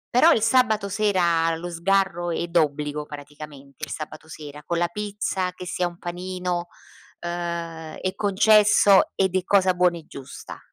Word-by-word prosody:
Però 320 +7 +7
il 225 - +2
sabato 225 -4 +2
sera 175 -5 +2
lo 175 +2 -6
sgarro 175 0 0
è 170 0 -1
d'obbligo 150 -3 0
praticamente, 145 -2 -10
il - - -15
sabato 155 0 -7
sera, 150 -2 -10
con 170 - -2
la 175 0 +1
pizza, 200 -1 -3
che 180 - -9
sia 180 -1 -1
un 175 - -10
panino, 180 0 -4 0.5
ehm, 170 -2 -5
è 185 - -2
concesso 205 0 +5
ed 190 -1 +1
è 185 - +1
cosa 190 -1 +3
buona 180 -1 +2
e 160 - -12
giusta. 135 -2 -10
175 Hz, 155 wpm, -24 LUFS, 160-195 Hz, 0.5 s, Però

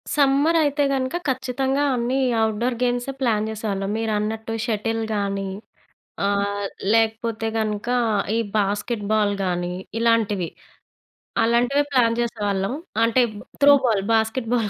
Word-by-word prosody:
Summer 285 +3 +3
అయితే 290 -1 +1
గనుక 260 +2 -1
ఖచ్చితంగా 265 +1 0
అన్ని 245 +3 0 0.3
ఔట్‌‌డోర్ 230 +3 -1
గేమ్స్ 245 +1 0
ప్లాన్ 220 -4 +1
జేసేవాళ్ళం. 205 -3 -3
మీరన్నట్టు 220 0 -2
షటిల్ 225 0 -1
గానీ, 200 -1 -2 0.8
ఆ! 200 - +2 0.6
లేకపోతే 225 0 +1
గనక 215 +1 -2 0.5
ఈ - - +2 0.2
బాస్కెట్ 205 +2 -1
బాల్ 210 -2 +2
గానీ, 175 -1 -2 0.2
ఇలాంటివి. 220 -6 +1 1.0
అలాంటివి 240 +5 +2
ప్లాన్ 235 -3 +3
జేసేవాళ్ళం. 205 -3 -1 0.3
అంటే 230 +2 +3 0.4
త్రో 285 0 +8
బాల్ 215 -5 +2
బాస్కెట్ 225 +2 0
బాల్ 225 -4 +1
225 Hz, 115 wpm, -23 LUFS, 210-250 Hz, 1.0 s, త్రో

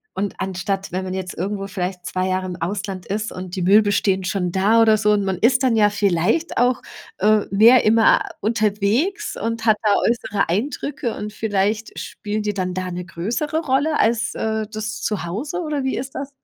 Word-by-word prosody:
und 200 0 -2
anstatt, 190 +1 -3
wenn 185 +2 -3
man 185 - -4
jetzt 190 0 -4
irgendwo 195 +2 -3
vielleicht 180 -2 -4
2 185 0 -1
Jahre 185 0 -1
im 180 -1 -6
Ausland 190 +1 -4
ist 215 +2 -3
und 180 -1 -7
die 185 - -3
Möbel 205 +3 +4
stehen 190 -1 +1
schon 180 -1 -1
da 210 +5 +3
oder 220 -1 +5
so 210 0 +2
und 205 -1 +1
man 190 -2 -1
ist 250 +5 +3
dann 245 -3 +3
ja 210 -1 +5
vielleicht 200 - 0
auch, 245 +1 +2 0.4
äh, 210 +1 +3
mehr 230 +5 +6
immer 225 +1 +5 0.2
unterwegs 220 - 0
und 230 0 -3
hat 220 -1 +4
da 215 - +2
äußere 210 -5 0
Eindrücke 240 - -2
und 210 0 -5
vielleicht 215 0 -1
spielen 210 0 -4
die 210 - -1
dann 185 -2 -2
da 185 0 -3
'ne 180 0 -5
größere 235 - -2
Rolle 295 +1 +1
als, 225 0 +1
äh, 220 -1 -1
das 215 0 -5
Zuhause 215 - -3
oder 300 -4 -2
wie 265 - 0
ist 270 +1 -6
das? 275 0 -4
210 Hz, 195 wpm, -21 LUFS, 190-230 Hz, 0.4 s, mehr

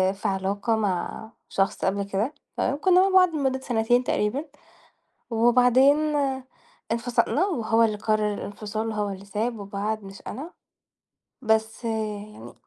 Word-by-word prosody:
في 200 - -19
علاقة 200 +4 0
مع 210 +1 -2 0.2
شخص 195 0 0
قبل 200 +1 0
كده 200 +8 -2 0.2
تمام؟ 280 - 0
كُنّا 365 +3 +4
مع 390 - +3
بعض 365 -1 +6
لمدة 265 -2 0
سَنتين 245 0 +1
تقريبًا 250 +7 -1 0.8
وبعدين 250 +4 +5 0.9
انفصلنا 240 +8 +1
وهو 230 - +2
اللي 215 -2 +1
قرّر 215 -1 +1
الإنفصال 215 +2 -4
هو 210 -1 -1
اللي 195 0 -7
ساب 220 +3 -2
وبعد 205 +2 -3
مش 195 0 -11
أنا، 305 +7 -6 0.9
بس 220 +1 0
يعني 215 -2 -3
من - - -10
220 Hz, 135 wpm, -25 LUFS, 205-245 Hz, 0.9 s, بعض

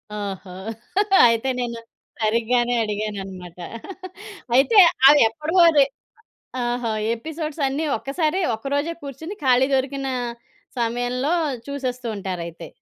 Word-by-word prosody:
ఓహో! 200 -2 -6 0.8
అయితే 230 +3 +1
నేను 235 -1 -3 0.4
సరిగ్గానే 235 +2 +1
అడిగానన్నమాట. 195 -4 -5 1.0
అయితే 285 - +4 0.3
అవేప్పడవో 295 +6 +4
అది. 290 -4 +5 0.8
ఆహా! 240 -1 -1 0.2
ఎపిసోడ్స్ 310 +4 -5
అన్నీ 280 +4 -2
ఒక్కసారి 310 +5 -1
ఒక్కరోజే 285 +8 -2
కూర్చొని 320 +8 -7
ఖాళీ 255 0 +4
దొరికిన 270 +1 -1 0.7
సమయంలో 245 +5 -1 0.4
చూసేస్తూ 255 -3 -4
ఉంటారయితే. 170 -4 -6
245 Hz, 90 wpm, -22 LUFS, 220-285 Hz, 1.0 s, అది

